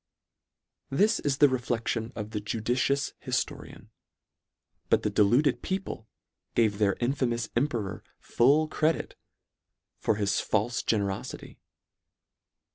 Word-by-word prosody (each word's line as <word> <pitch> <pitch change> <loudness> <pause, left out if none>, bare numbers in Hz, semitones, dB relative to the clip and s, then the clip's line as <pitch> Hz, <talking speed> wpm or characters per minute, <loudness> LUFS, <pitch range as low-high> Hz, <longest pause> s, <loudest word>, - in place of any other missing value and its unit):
This 205 +11 +3
is 140 -2 0
the 145 - +7
reflection 120 -3 -2
of 105 0 -5
the 105 -2 -3
judicious 120 +6 0
hif - - +1
torian: - - -12 1.0
but - - +3
the - - 0
deluded 120 +9 +3
people 190 - -4 0.5
gave 110 -3 +2
their 100 -2 +3
infamous 120 -2 0
emperor 120 -6 -1 0.2
full 145 +6 +3
credit 155 +1 0 0.8
for - - +1
his 100 -1 0
falfe 110 +3 0
generofity. 100 -3 -2
120 Hz, 110 wpm, -28 LUFS, 105-140 Hz, 1.0 s, the